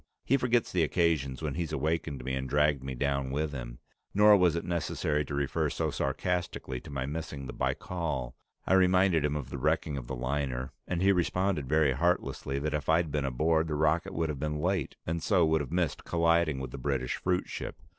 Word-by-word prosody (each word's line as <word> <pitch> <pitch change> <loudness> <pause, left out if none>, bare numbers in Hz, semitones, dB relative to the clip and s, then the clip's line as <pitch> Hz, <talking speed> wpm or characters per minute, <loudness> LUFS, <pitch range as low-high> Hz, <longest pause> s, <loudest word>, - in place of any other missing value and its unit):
He 135 - +3
forgets 120 -3 +1
the 90 - +1
occasions 80 -4 +1
when 75 -3 -1
he's 85 -1 -3
awakened 75 -2 -1
me 65 - -2
and 65 0 -3
dragged 75 -1 +2
me 65 -1 -4
down 70 0 -1
with 75 +3 -1
him. - - -6 0.4
Nor 105 +1 +8
was 90 -4 +4
it 85 - -3
necessary 80 -3 -1
to 70 - -4
refer 70 -1 0
so - - -1
sarcastically 80 -3 -2
to - - -12
my 70 -2 -3
missing 75 -2 -5
the - - -6
Baikal; 75 -9 -2 0.3
I - - +2
reminded 90 -3 +4
him 75 0 0
of 70 -4 -5
the - - -4
wrecking 70 - 0
of - - -9
the 65 - -4
liner, 65 0 -2 0.2
and 90 0 -1
he 100 - +6
responded 90 -5 0
very 75 -2 +4
heartlessly 70 -2 0
that 75 +1 -1
if 75 0 -2
I'd 80 -1 +3
been 75 -1 0
aboard, 80 +5 +1
the 75 - -2
rocket 80 +5 +1
would 80 -1 0
have 75 -3 -4
been 75 +1 -2
late, 90 -2 -1
and 85 +1 -2
so 90 -3 +3
would 80 -1 +2
have 70 - -6
missed 90 -2 -1
colliding 85 -3 +2
with 65 -2 -5
the 70 - -7
British 65 -2 -1
fruitship. 90 0 -2
75 Hz, 205 wpm, -30 LUFS, 70-85 Hz, 0.4 s, Nor